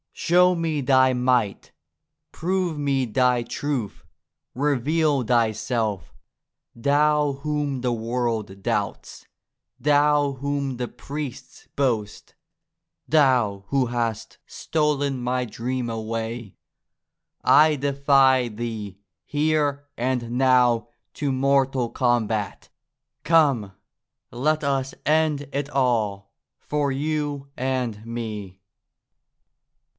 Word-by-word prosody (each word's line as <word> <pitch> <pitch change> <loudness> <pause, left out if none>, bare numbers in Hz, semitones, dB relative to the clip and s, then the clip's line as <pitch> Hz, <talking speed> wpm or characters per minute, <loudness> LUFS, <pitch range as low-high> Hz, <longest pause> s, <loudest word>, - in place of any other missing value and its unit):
Show 180 +1 +3
me 160 -3 -1
Thy 130 -1 +4
might; 125 -4 0 0.6
prove 180 -1 -1
me 140 -2 0
Thy 125 +1 +2
truth; 125 -3 -4 0.5
reveal 145 +1 +1
Thyself, 110 - 0 0.6
Thou 145 +3 +2
whom 145 -1 -2
the 125 -1 0
world 115 -4 -2
doubts; - - -3 0.5
Thou 145 +1 +3
whom 140 -1 -3
the 125 0 -3
priests 140 -1 -8
boast; 115 -7 -2 0.7
Thou 125 -10 +2
who 135 -2 +1
hast 115 -2 -3
stolen 145 -4 -1
my 125 +1 -1
dream 125 +2 -3
away! 115 -1 -4 0.9
I 155 0 +6
defy 135 -2 +3
Thee 105 -3 -6 0.3
here 145 -1 0
and 120 -1 -1
now 125 -2 +3 0.3
to 145 -2 -1
mortal 135 -2 +1
combat! 115 -5 -1 0.5
Come, 140 - +3 0.6
let 150 +5 0
us 135 -1 -1
end 150 -2 +1
it 140 +1 -2
all, 110 -8 0 0.3
for 145 -2 -1
you 145 0 -2
and 125 -5 -2
me 105 -5 -6
130 Hz, 90 wpm, -24 LUFS, 115-145 Hz, 0.9 s, I